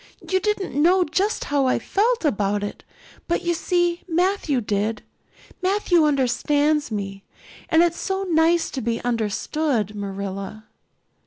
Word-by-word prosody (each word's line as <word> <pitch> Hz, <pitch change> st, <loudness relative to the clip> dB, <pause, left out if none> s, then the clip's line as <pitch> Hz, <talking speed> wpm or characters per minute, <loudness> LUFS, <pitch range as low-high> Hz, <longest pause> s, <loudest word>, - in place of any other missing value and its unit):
You 375 Hz, -, +2 dB
didn't 420 Hz, -1 st, -1 dB
know 350 Hz, +6 st, +4 dB
just 380 Hz, +6 st, 0 dB
how 280 Hz, -2 st, +1 dB
I 255 Hz, -, +2 dB
felt 455 Hz, 0 st, 0 dB
about 205 Hz, -6 st, 0 dB
it, 205 Hz, -, -6 dB, 0.4 s
but 345 Hz, -, 0 dB
you 345 Hz, -, +1 dB
see 350 Hz, 0 st, 0 dB
Matthew 350 Hz, -5 st, +1 dB
did. 210 Hz, 0 st, -2 dB, 0.6 s
Matthew 370 Hz, -3 st, +3 dB
understands 290 Hz, +2 st, +1 dB
me, 195 Hz, -2 st, -5 dB, 0.5 s
and 320 Hz, +1 st, +5 dB
it's 345 Hz, -1 st, 0 dB
so 385 Hz, 0 st, -2 dB
nice 335 Hz, -1 st, +2 dB
to 265 Hz, -, -4 dB
be 230 Hz, 0 st, -1 dB
understood, 230 Hz, +1 st, -1 dB
Marilla." 200 Hz, +1 st, -5 dB
295 Hz, 135 wpm, -23 LUFS, 215-350 Hz, 0.6 s, and